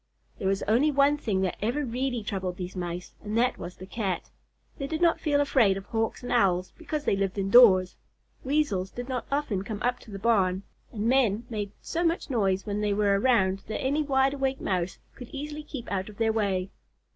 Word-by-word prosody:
There 190 - -1
was 195 +1 0
only 245 +8 +3
one 285 0 +4
thing 205 -9 -1
that 185 -2 -1
ever 245 +7 0
really 245 -1 -2
troubled 190 -3 -3
these 180 0 -6
Mice, 175 0 -5
and 215 +1 -3
that 245 +2 +2
was 175 +1 -7
the 185 - -10
Cat. 190 -2 -3 0.5
They 275 - -2
did 315 +2 -3
not 340 -1 +3
feel 290 -2 +1
afraid 240 -9 +3
of 195 - -7
Hawks 225 +2 -2
and 245 - -5
Owls 185 -6 +2
because 305 -2 -4
they - - +3
lived 195 0 -1
indoors. 195 -2 +6 0.5
Weasels 260 -10 0
did 245 +4 -7
not 255 -2 -3
often 275 -10 -1
come 210 0 -5
up 245 +1 +1
to - - -16
the 200 - -6
barn, 195 -3 +2 0.3
and 215 -1 -3
men 235 -4 +2
made 205 -3 -3
so 340 +1 -2
much 330 -3 0
noise 195 -5 +1
when 210 0 -2
they 210 -1 +1
were 200 -1 +3
around 195 -6 +3
that 220 - -3
any 280 +4 +1
wide 270 -2 +2
awake 270 -1 -1
Mouse 180 -1 -1 0.2
could 245 - -10
easily 295 +2 -6
keep 280 -5 -8
out 190 0 -2
of 205 - -13
their 225 -1 +2
way. 195 -4 0
220 Hz, 210 wpm, -27 LUFS, 195-265 Hz, 0.5 s, indoors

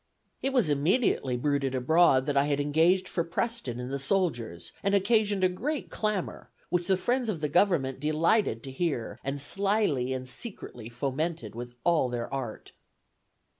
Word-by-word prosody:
"It 270 - 0
was 250 -9 +3
immediately 145 - +2
bruited 140 0 0
abroad 130 0 +4
that 145 -1 -1
I 140 0 +4
had 145 -1 0
engaged 165 +6 +3
for 170 - -1
Preston 170 - -2
and 125 +2 -5
the 140 - -1
soldiers, 135 - -1
and 200 0 +2
occasioned 205 -1 +2
a - - +7
great 260 +12 -3
clamor, 210 -4 -2 0.2
which 175 -1 0
the 190 - +3
friends 245 +3 0
of 185 -7 -2
the 150 - -1
government 145 -5 +2
delighted 155 - +1
to 135 - -6
hear, 135 -5 -2
and 135 +1 -3
slily 195 - +1
and 130 -1 -3
secretly 125 - -6
fomented 140 +7 -3
with 120 +1 -7
all 165 -7 +3
their 120 +1 -4
art." 125 -5 -5
155 Hz, 165 wpm, -28 LUFS, 130-195 Hz, 0.2 s, a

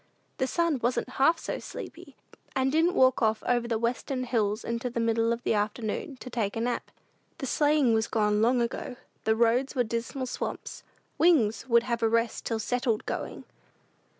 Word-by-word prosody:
The 260 - +1
sun 335 -1 +1
wasn't 240 +2 0
half 330 +4 +5
so - - -4
sleepy, - - -9 0.4
and 265 0 +2
didn't 330 +4 +2
walk 260 -1 +4
off 220 -1 +1
over 240 -1 +1
the 230 -1 0
western 250 +3 -2
hills 220 -3 0
in 235 0 -2
the 240 -1 -3
middle 230 0 +2
of 235 +1 -2
the - - +1
afternoon 215 +5 -2
to 255 - -7
take 215 -4 -1
a 225 - -2
nap. 240 +1 -2 0.5
The - - -4
sleighing 290 -2 +3
was 220 0 +1
gone 210 -1 +1
long 240 +2 +3
ago. 235 +2 -4 0.3
The 220 - +3
roads 240 +5 +2
were 250 - +3
dismal 235 +3 -3
swamps. 250 - -5 0.4
"Wings" 265 -8 +3
would 235 0 +5
have 235 -1 -2
a 225 - +3
rest 230 0 0
till 225 - 0
"settled 235 0 -1
going." - - -4
235 Hz, 180 wpm, -28 LUFS, 225-260 Hz, 0.5 s, half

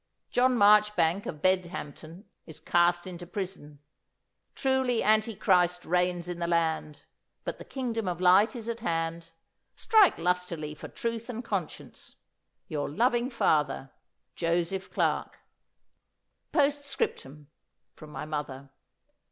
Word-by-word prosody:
John 250 0 +3
Marchbank, 205 -3 +4
of 150 -1 -7
Bedhampton, 175 -2 -2 0.2
is 160 - -11
cast 175 0 +2
into 175 -1 -8
prison. 180 -7 -6 0.8
Truly 265 -3 +1
Antichrist 195 -5 +2
reigns 180 0 0
in 175 -1 -5
the 170 - -1
land, 160 -3 -1 0.4
but - - -5
the - - -8
kingdom 230 -6 -3
of 175 -1 -2
light 185 +6 +5
is 230 -2 -7
at 235 0 -3
hand. 165 -4 -2 0.5
Strike 435 -4 +4
lustily 170 -3 -2
for 150 - -9
truth 230 0 -4
and 240 0 -5
conscience. 195 -8 -5 0.5
Your 145 -2 -3
loving 240 - +1
father, 150 - 0 0.4
JOSEPH 175 +3 -1
CLARKE."' - - -1 1.1
'"Postscriptum 280 - -1 0.5
(from 155 - -13
my 150 0 -6
mother). 140 -3 -5
180 Hz, 115 wpm, -28 LUFS, 165-225 Hz, 1.1 s, light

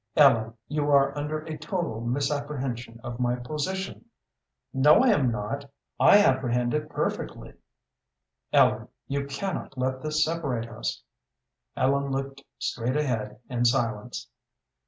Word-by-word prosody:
"Ellen, 115 -6 +5
you 150 -1 -1
are 140 -1 +4
under 150 +1 -2
a 155 -1 -7
total 155 - -3
misapprehension 135 -2 -2
of 120 0 -6
my 125 0 +1
position." 155 - -4 0.7
"No, 145 - +6
I 260 - +5
am 145 - +4
not. 120 +6 -4 0.3
I - - +8
apprehend 125 -4 +2
it 150 0 -1
perfectly." - - -3 1.0
"Ellen, - - +4 0.2
you 140 0 -2
cannot 140 -1 -4
let 130 +1 -1
this 155 +1 +1
separate 140 -8 -2
us." 110 -1 -4 0.7
Ellen 140 +1 +2
looked 135 0 -3 0.2
straight 125 +4 -1
ahead 110 -8 -2
in 120 -1 -1
silence. 120 - 0
135 Hz, 125 wpm, -27 LUFS, 120-150 Hz, 1.0 s, I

